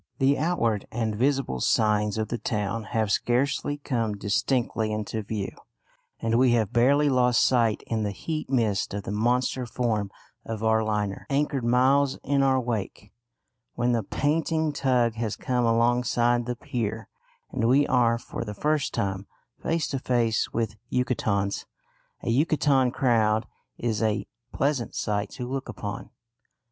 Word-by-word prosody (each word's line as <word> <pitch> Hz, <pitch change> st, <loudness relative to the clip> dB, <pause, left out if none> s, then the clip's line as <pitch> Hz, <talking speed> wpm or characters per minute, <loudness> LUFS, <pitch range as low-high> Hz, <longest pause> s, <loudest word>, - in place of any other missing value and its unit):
The 135 Hz, +1 st, +3 dB
outward 125 Hz, -, 0 dB
and 110 Hz, -2 st, -1 dB
visible 130 Hz, -, 0 dB
signs 105 Hz, -, +2 dB
of 110 Hz, -1 st, -2 dB
the 120 Hz, -, -3 dB
town 105 Hz, +1 st, -2 dB
have 110 Hz, -3 st, -1 dB
scarcely 135 Hz, +6 st, +1 dB
come 115 Hz, -7 st, -2 dB
distinctly 110 Hz, +2 st, 0 dB
into 110 Hz, +1 st, -3 dB
view, 105 Hz, -1 st, -4 dB, 0.7 s
and 115 Hz, +1 st, +1 dB
we 125 Hz, -2 st, +4 dB
have 110 Hz, -4 st, +1 dB
barely 140 Hz, +5 st, +4 dB
lost 125 Hz, -3 st, +3 dB
sight 115 Hz, -4 st, +2 dB
in 115 Hz, -1 st, -1 dB
the 105 Hz, -, 0 dB
heat 155 Hz, -, -4 dB
mist 110 Hz, -7 st, 0 dB
of 100 Hz, -, -4 dB
the -, -, -5 dB
monster 125 Hz, +3 st, 0 dB
form 110 Hz, -4 st, -1 dB, 0.3 s
of 110 Hz, -1 st, -5 dB
our 110 Hz, 0 st, +3 dB
liner, 105 Hz, -2 st, -2 dB
anchored 140 Hz, -2 st, 0 dB
miles 130 Hz, +3 st, +3 dB
in 140 Hz, 0 st, +1 dB
our 135 Hz, -1 st, +3 dB
wake, 105 Hz, -4 st, -4 dB, 0.6 s
when 120 Hz, +1 st, +1 dB
the 115 Hz, -1 st, +1 dB
panting 155 Hz, -, 0 dB
tug 125 Hz, -5 st, +2 dB
has 110 Hz, -2 st, -2 dB
come 125 Hz, -1 st, 0 dB
alongside 120 Hz, +1 st, +2 dB
the 125 Hz, -, -2 dB
pier 115 Hz, -2 st, -4 dB, 0.4 s
and 115 Hz, -, 0 dB
we 140 Hz, +4 st, +4 dB
are 120 Hz, -3 st, +3 dB
for 115 Hz, -, -6 dB
the 105 Hz, -2 st, -6 dB
first 150 Hz, +5 st, 0 dB
time 95 Hz, 0 st, -2 dB, 0.3 s
face 165 Hz, 0 st, 0 dB
to 135 Hz, -, -2 dB
face 120 Hz, -3 st, +1 dB
with 115 Hz, -2 st, -2 dB
Yucatecans. 105 Hz, -6 st, 0 dB, 0.6 s
A -, -, -2 dB
Yucatecan 140 Hz, -3 st, +3 dB
crowd 110 Hz, -4 st, +2 dB, 0.3 s
is 115 Hz, -2 st, -1 dB
a 110 Hz, -1 st, 0 dB, 0.3 s
pleasant 140 Hz, -4 st, -1 dB
sight 105 Hz, -1 st, -1 dB
to 125 Hz, -, -6 dB
look 135 Hz, +1 st, -4 dB
upon. 100 Hz, -1 st, -6 dB
120 Hz, 150 wpm, -26 LUFS, 110-130 Hz, 0.7 s, we